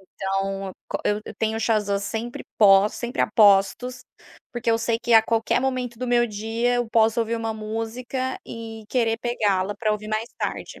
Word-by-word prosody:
Então 195 0 -3 0.2
co - - -2
eu 210 +1 +1
eu - - -9
tenho 220 0 -1 0.4
sempre 225 +4 -5
pos 200 -1 +6
sempre 240 0 -4
aposto, 205 +2 +4 0.6
porque 240 -2 -1
eu 225 - +2
sei 230 0 0
que 240 0 -1
a 225 - +8
qualquer 225 +2 +1
momento 250 -3 -2
do 250 - -3
meu 240 0 +3
dia 225 +3 -1
eu 240 -2 -1
posso 225 +1 +3
ouvir 230 +1 -1
uma 225 -1 -2
música 225 +4 -4
e 225 -1 -8
querer 225 -1 +1
pegá-la 205 -5 0
pra 215 -2 +1
ouvir 210 0 -5
mais 215 +2 -2
tarde. - - -4
225 Hz, 170 wpm, -24 LUFS, 210-240 Hz, 0.6 s, a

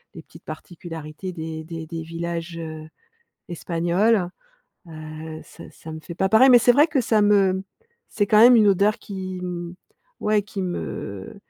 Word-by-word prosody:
les 165 - -10
petites 165 - -17
particularités 165 +2 -8
des 160 -1 -6
des 165 -1 -7
des 165 -1 -5
villages, 170 +1 -5
heu, 155 -1 -7 0.6
espagnols. 175 +4 +1 0.6
Heu, 155 0 -8
ça - - -14
ça 160 - -11
me 155 - -7
fait 165 +2 -8
pas 190 +2 0
pareil, 255 +5 +6
mais 245 - +8
c'est 245 +1 +5
vrai 295 +4 +6
que 285 -4 +1
ça 220 -2 +2
me 195 -2 +3 0.5
c'est 205 - 0
quand 210 - +4
même 245 +2 +8
une 215 -2 +5
odeur 205 +4 +2
qui, 185 -2 -6
mmh, 175 -1 -5 0.5
ouais 210 -1 +2
qui 205 -2 -6
me 100 - -5
175 Hz, 165 wpm, -23 LUFS, 160-205 Hz, 0.6 s, mais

